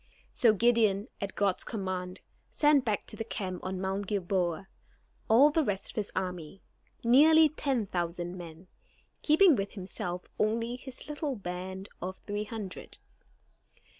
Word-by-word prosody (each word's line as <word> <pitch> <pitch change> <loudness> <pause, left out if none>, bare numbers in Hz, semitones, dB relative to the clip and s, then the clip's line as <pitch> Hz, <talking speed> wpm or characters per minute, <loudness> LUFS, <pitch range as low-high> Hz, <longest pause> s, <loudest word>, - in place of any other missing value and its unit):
So 235 -4 +5
Gideon, 220 -1 +3
at 200 -1 -4
God's 200 -2 +1
command, 185 -3 -4 0.3
sent 295 -3 +4
back 215 -4 -1
to - - -6
the 225 - -4
camp 190 -5 -5
on 185 0 -3
Mount 190 +1 -2
Gilboa 185 -2 -1 0.6
all 265 +7 +7
the 320 +1 +2
rest 200 -5 -2
of - - -22
his 210 -2 -3
army, 180 -1 -4 0.4
nearly 310 +6 +7
ten 270 -6 -1
thousand 175 -1 -3
men, 170 -1 -10 0.6
keeping 320 +1 +6
with 200 -2 -3
himself 180 -2 -5
only 230 +3 0
his 255 0 -9
little 295 -2 -3
band 190 0 -6
of 185 +1 -4
three 205 0 -3
hundred. 210 -4 -7
200 Hz, 140 wpm, -30 LUFS, 185-240 Hz, 0.6 s, all